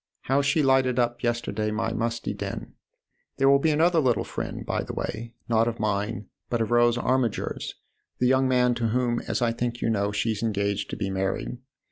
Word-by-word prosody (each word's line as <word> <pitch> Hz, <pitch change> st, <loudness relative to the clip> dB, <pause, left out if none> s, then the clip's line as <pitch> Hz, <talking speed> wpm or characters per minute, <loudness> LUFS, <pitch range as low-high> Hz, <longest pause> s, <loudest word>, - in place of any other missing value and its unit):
How 135 Hz, +2 st, +2 dB
she 140 Hz, +2 st, +2 dB
lighted 130 Hz, -2 st, +3 dB
up 120 Hz, -1 st, +1 dB
yesterday 115 Hz, -3 st, -1 dB
my 110 Hz, +1 st, -1 dB
musty 115 Hz, 0 st, -2 dB
den! -, -, -6 dB, 0.6 s
There 135 Hz, -, +3 dB
will 140 Hz, 0 st, +6 dB
be 160 Hz, -, +2 dB
another 165 Hz, +3 st, +3 dB
little 125 Hz, -7 st, +2 dB
friend, -, -, -5 dB
by -, -, -1 dB
the -, -, -6 dB
way 115 Hz, +1 st, -5 dB
not 115 Hz, 0 st, +3 dB
of 115 Hz, -1 st, -3 dB
mine, 105 Hz, +1 st, -1 dB, 0.2 s
but 120 Hz, -, 0 dB
of 115 Hz, 0 st, -1 dB
Rose 120 Hz, 0 st, +4 dB
Armiger's, 125 Hz, -2 st, -1 dB, 0.4 s
the 125 Hz, -, +1 dB
young 130 Hz, +1 st, +4 dB
man 125 Hz, -1 st, +3 dB
to 120 Hz, -1 st, -1 dB
whom, 120 Hz, +1 st, +1 dB
as -, -, 0 dB
I 115 Hz, -, +2 dB
think 120 Hz, +1 st, -3 dB
you 115 Hz, -, 0 dB
know, 100 Hz, -1 st, 0 dB
she's 105 Hz, 0 st, -1 dB
engaged 100 Hz, -2 st, -1 dB
to -, -, -4 dB
be 95 Hz, -, -2 dB
married. 95 Hz, +5 st, -2 dB
120 Hz, 195 wpm, -26 LUFS, 110-125 Hz, 0.6 s, will